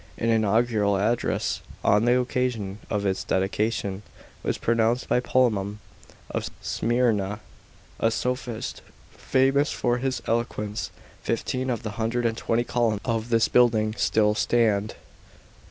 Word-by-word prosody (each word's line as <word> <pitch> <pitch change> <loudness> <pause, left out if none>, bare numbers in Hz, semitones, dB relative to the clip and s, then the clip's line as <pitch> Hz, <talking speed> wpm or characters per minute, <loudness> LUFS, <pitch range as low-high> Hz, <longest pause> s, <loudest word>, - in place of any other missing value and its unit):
An 115 - 0
inaugural 110 -2 +2
address, 110 +4 0 0.2
on 105 +3 +4
the 125 +1 +4
occasion 120 -5 -2
of 105 -1 -1
its 95 -1 0
dedication, 100 +1 -1 0.4
was - - -1
pronounced 115 +2 +1
by - - +3
Polemon 110 -6 +1 0.5
of - - -2
Smyrna, 110 -4 0 0.6
a 115 - +3
sophist 125 0 -3 0.3
famous 135 +2 +2
for 120 0 0
his 130 0 -1
eloquence 110 -2 -2 0.3
Fifteen 130 +1 -2
of 120 -4 -2
the 110 - -3
hundred 120 +2 0
and 115 -1 +1
twenty 115 +1 0
columns 115 -4 0
of 115 -2 -1
this 115 -1 +3
building 110 -3 +3
still 105 -2 +2
stand. 110 -2 +1
115 Hz, 125 wpm, -25 LUFS, 105-120 Hz, 0.6 s, on